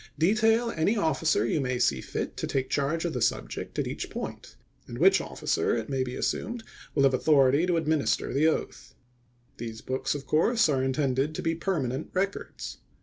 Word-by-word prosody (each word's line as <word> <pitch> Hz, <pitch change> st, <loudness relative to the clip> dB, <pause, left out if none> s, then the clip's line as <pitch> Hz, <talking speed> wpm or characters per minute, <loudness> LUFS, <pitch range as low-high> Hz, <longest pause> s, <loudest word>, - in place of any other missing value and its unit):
Detail 225 Hz, +6 st, +3 dB
any 195 Hz, +8 st, +1 dB
officer 160 Hz, -, +2 dB
you 145 Hz, +5 st, 0 dB
may 125 Hz, -1 st, -1 dB
see 70 Hz, -, +2 dB
fit -, -, -4 dB
to -, -, -2 dB
take 130 Hz, -1 st, -2 dB
charge 150 Hz, +4 st, 0 dB
of 170 Hz, -, -1 dB
the 125 Hz, -, -3 dB
subject -, -, -2 dB
at -, -, 0 dB
each -, -, -4 dB
point; -, -, -7 dB, 0.3 s
and -, -, -7 dB
which -, -, +5 dB
officer, -, -, -1 dB
it 110 Hz, -1 st, -4 dB
may 135 Hz, -2 st, 0 dB
be 125 Hz, 0 st, -5 dB
assumed, 235 Hz, -1 st, -2 dB, 0.3 s
will 140 Hz, -, +3 dB
have 135 Hz, -1 st, +4 dB
authority 140 Hz, +3 st, +4 dB
to 175 Hz, -2 st, +2 dB
administer 155 Hz, -2 st, 0 dB
the 145 Hz, +4 st, +3 dB
oath. 160 Hz, -, -3 dB, 0.6 s
These 110 Hz, -1 st, -6 dB
books, 130 Hz, +2 st, -2 dB
of 140 Hz, -, -6 dB
course, 225 Hz, +9 st, +3 dB
are 135 Hz, -3 st, +2 dB
intended 135 Hz, +2 st, 0 dB
to -, -, -4 dB
be 165 Hz, -, +1 dB
permanent 155 Hz, -6 st, -2 dB
records. 195 Hz, +2 st, -3 dB
150 Hz, 185 wpm, -27 LUFS, 130-165 Hz, 0.6 s, which